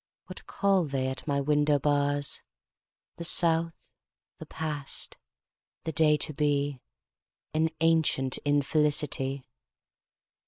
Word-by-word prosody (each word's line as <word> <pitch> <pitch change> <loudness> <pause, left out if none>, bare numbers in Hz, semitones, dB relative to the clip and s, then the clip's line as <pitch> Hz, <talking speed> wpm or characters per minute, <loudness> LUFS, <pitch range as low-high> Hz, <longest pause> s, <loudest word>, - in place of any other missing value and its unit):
What - - -11
call 195 -4 +1
they 135 -2 -2
at 130 - -7
my 140 -1 0
window 145 +1 +2
bars? 145 0 0 0.8
The 170 - -6
South, 165 -1 +3 0.5
the - - -10
past, 150 -3 -5 0.7
the 160 - -3
day 150 0 +3
to 155 - +3
be, 145 -2 -1 0.7
An 160 +1 +1
ancient 160 -5 +2
infelicity. 145 -2 0
145 Hz, 105 wpm, -27 LUFS, 140-160 Hz, 0.8 s, South